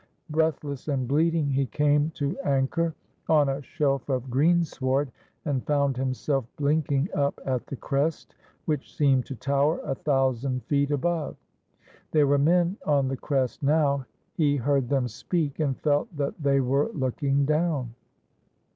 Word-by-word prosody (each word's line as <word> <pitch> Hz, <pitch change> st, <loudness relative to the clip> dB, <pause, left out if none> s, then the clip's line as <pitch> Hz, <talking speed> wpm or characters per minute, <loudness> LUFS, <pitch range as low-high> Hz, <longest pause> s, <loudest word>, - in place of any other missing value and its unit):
Breathless 150 Hz, -3 st, -1 dB
and 135 Hz, -4 st, -1 dB
bleeding, 155 Hz, +1 st, +2 dB
he 135 Hz, 0 st, +1 dB
came 145 Hz, +5 st, +2 dB
to 145 Hz, -2 st, -2 dB
anchor 145 Hz, +4 st, 0 dB, 0.3 s
on 150 Hz, -3 st, +4 dB
a 135 Hz, +1 st, -2 dB
shelf 140 Hz, -2 st, -1 dB
of 130 Hz, -1 st, -2 dB
greensward, 140 Hz, -2 st, +1 dB, 0.3 s
and 135 Hz, -4 st, -1 dB
found 140 Hz, -2 st, +2 dB
himself 130 Hz, +1 st, -1 dB
blink 145 Hz, +1 st, +1 dB
ing 140 Hz, +3 st, +2 dB
up 140 Hz, -1 st, 0 dB
at 130 Hz, -2 st, -2 dB
the -, -, -5 dB
crest, 145 Hz, +5 st, -2 dB, 0.3 s
which 150 Hz, -4 st, -3 dB
seemed 135 Hz, -4 st, +3 dB
to 135 Hz, -, -5 dB
tower 140 Hz, +5 st, +1 dB
a 135 Hz, -, -2 dB
thousand 130 Hz, -2 st, 0 dB
feet 140 Hz, -1 st, +1 dB
above. 160 Hz, +2 st, -1 dB, 0.7 s
There 150 Hz, -2 st, +4 dB
were 140 Hz, 0 st, +3 dB
men 175 Hz, +5 st, +3 dB
on 140 Hz, -3 st, +2 dB
the 135 Hz, -, -1 dB
crest 135 Hz, -3 st, -1 dB
now. 140 Hz, -2 st, +2 dB, 0.3 s
He 145 Hz, -3 st, +2 dB
heard 135 Hz, -1 st, +1 dB
them 135 Hz, -3 st, +1 dB
speak, 150 Hz, -, -2 dB
and 140 Hz, -4 st, 0 dB
felt 150 Hz, +2 st, 0 dB
that 140 Hz, -1 st, -1 dB
they 140 Hz, -1 st, +3 dB
were 135 Hz, -, +1 dB
looking 140 Hz, +1 st, 0 dB
down. 150 Hz, -5 st, 0 dB
140 Hz, 150 wpm, -26 LUFS, 135-150 Hz, 0.7 s, on